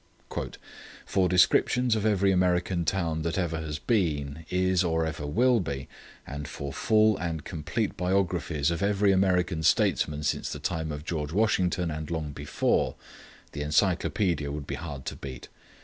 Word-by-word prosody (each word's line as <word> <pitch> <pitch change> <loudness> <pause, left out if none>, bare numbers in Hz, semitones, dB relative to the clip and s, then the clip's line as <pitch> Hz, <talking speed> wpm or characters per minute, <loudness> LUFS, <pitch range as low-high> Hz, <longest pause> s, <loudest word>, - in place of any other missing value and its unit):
"For 95 -2 +1
descriptions 115 +6 +4
of 110 0 +1
every 100 -2 +3
American 90 -1 +1
town 80 -3 0
that 85 +2 -2
ever 85 -3 -1
has 75 -2 -4
been, 75 -4 -1
is, 95 0 +2
or 80 -2 +1
ever 75 -2 -4
will 120 - +3
be, 70 -7 -4 0.4
and 75 +1 -6
for 70 -1 -6
full 110 -1 +3
and 80 -3 -3
complete 85 +7 -3
biographies 90 -5 0
of 85 - -2
every 100 0 +3
American 90 -3 +2
statesman 75 -1 +2
since 75 - -1
the - - -4
time 80 -1 -2
of 75 +1 -6
George 75 -4 -3
Washington 90 -4 +1
and 75 0 -5
long 80 -3 -3
before, 70 0 0 0.6
the 75 - -5
Encyclopædia 85 0 +1
would 75 0 -5
be - - -5
hard 75 -5 -6
to - - -4
beat. 65 -3 -8
85 Hz, 155 wpm, -27 LUFS, 75-95 Hz, 0.6 s, descriptions